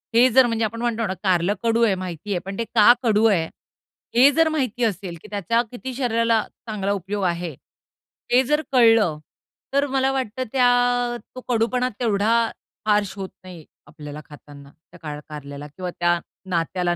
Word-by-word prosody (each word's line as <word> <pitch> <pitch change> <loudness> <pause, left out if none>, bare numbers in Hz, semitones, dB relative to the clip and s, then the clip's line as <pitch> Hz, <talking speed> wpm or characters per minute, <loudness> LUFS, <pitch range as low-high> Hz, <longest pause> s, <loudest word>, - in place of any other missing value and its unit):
हे 245 +2 +6
जर 255 +1 +6
म्हणजे 230 -1 0
आपण 230 +2 -5
म्हणतो 230 -1 -1
ना 190 - -2
कारलं 185 0 +2
कडू 230 0 +2
आहे 200 -4 +3
माहिती 185 +1 -6
आहे, 185 - 0
पण 195 0 -6
ते 230 - -1
का 225 +2 +8
कडू 220 -2 +3
आहे? 180 -7 +3 0.7
हे 260 +4 +7
जर 325 +2 +3
माहिती 255 -6 -1
असेल, 195 -5 -2
की - - -13
त्याचा 210 +4 +1
किती 255 +1 -6
शरीराला 230 -3 +1 0.3
चांगला 200 -3 -2
उपयोग 200 +1 -3
आहे. 170 -3 -2 0.8
हे 250 +2 +5
जर 300 +4 +1
कळलं, 225 - +4 0.6
तर 280 +1 +3
मला 265 0 +1
वाटतं 260 -2 -2
त्या 245 -1 +2 0.2
तो 255 - -7
कडूपणा 245 +2 +1
तेवढा 220 -1 +1 0.5
हार्श 205 -2 +2
होत 190 -1 -5
नाही, 175 -4 -11 0.2
आपल्याला 150 -1 -9
खाताना. 145 -2 -14
त्या 170 +2 -20
कार 150 -2 -6
कारलेला 145 -1 -8
किंवा 180 +5 -6
त्या 175 0 +2 0.3
नात्याला 175 +1 0
215 Hz, 170 wpm, -22 LUFS, 175-245 Hz, 0.8 s, का